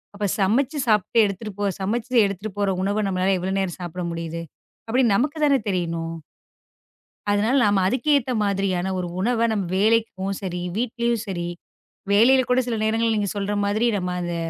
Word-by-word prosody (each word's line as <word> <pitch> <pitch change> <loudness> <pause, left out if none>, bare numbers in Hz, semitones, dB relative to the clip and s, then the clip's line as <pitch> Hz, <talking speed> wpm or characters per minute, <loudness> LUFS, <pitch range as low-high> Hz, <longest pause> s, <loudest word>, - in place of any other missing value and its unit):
அப்பச் 205 -2 -1
சமைச்சு 255 +10 +1
சாப்பிட்டு 210 +1 +2
எடுத்துட்டு 200 +1 -5
போ 205 - 0 0.2
சமைச்சு 225 +5 -2
எடுத்துட்டு 200 +1 -4
போற 200 -1 +1
உணவ 205 +2 0
நம்மளால 190 +1 +1
எவ்வளவு 190 +2 -2
நேரம் 190 -3 -2
சாப்பிட 175 +1 -5
முடியுது? 165 0 -5 0.5
அப்படி 255 +3 +3
நமக்குத் 290 +8 +1
தானே 280 -2 +4
தெரியணும். 170 -3 -2 1.2
அதனால 210 +5 +2
நாம 205 -2 +3
அதுக்கேத்த 260 +2 +1
மாதிரியான 190 -2 0
ஒரு 180 - -3
உணவ 230 +3 +1
நம்ம 205 -3 -1
வேலைக்கும் 205 -2 +1
சரி 180 -2 -4 0.2
வீட்டிலும் 235 -1 -1
சரி 175 -3 -3 0.6
வேலையில 255 +5 +5
கூடச் 250 0 +2
சில 230 -2 -1
நேரங்கள்ல 225 +1 +1
நீங்கச் 205 -1 -2
சொல்ற 200 +1 -1
மாதிரி 210 +3 +1
நாம 180 -1 -3
அந்த 175 -1 -3
205 Hz, 155 wpm, -23 LUFS, 190-230 Hz, 1.2 s, வேலையில